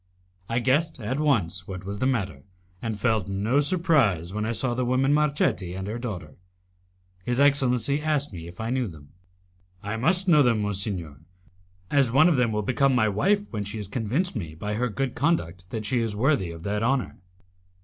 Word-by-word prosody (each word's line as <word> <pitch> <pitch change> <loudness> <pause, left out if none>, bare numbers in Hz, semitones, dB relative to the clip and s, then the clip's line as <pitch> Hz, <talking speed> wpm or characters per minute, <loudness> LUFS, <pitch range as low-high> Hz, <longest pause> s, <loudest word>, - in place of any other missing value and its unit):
I 115 - 0
guessed 135 +6 +1
at 120 +5 -3
once 95 - 0
what 95 -1 -7
was 100 +1 -5
the 130 - +1
matter, 100 - -1 0.4
and 110 -2 -3
felt 110 -4 +1
no 105 +8 +1
surprise 145 - +2
when 105 +1 -2
I - - 0
saw 120 +1 0
the 125 +1 -1
woman 130 +3 +2
Marchetti 140 - +1
and 95 0 -4
her 110 +3 -4
daughter. 105 -7 -6 0.9
His 120 +4 -1
excellency 140 -1 +2
asked 150 -6 -1
me 85 -2 -7
if 85 +1 -12
I 110 +1 -2
knew 130 -2 0
them. 75 -5 -12 0.7
"I 105 +2 -3
must 180 +10 +2
know 155 -4 +6
them, 115 -5 +2
monsignor, 95 - -3 0.7
as 135 -5 +3
one 150 +6 +6
of 175 - +3
them 125 -3 +2
will 105 0 -1
become 130 +4 +2
my 110 -3 +3
wife 200 - +2
when 105 -3 -3
she 100 +2 -6
has 105 -3 -5
convinced 125 - -1
me 80 -8 -5
by 105 +6 -4
her 125 +3 0
good 135 +3 -2
conduct 95 - -1
that 110 +2 -4
she 125 +3 +1
is 115 -3 -2
worthy 120 - +1
of 85 0 -9
that 105 +1 -1
honour." 130 +3 0
115 Hz, 195 wpm, -25 LUFS, 100-135 Hz, 0.9 s, know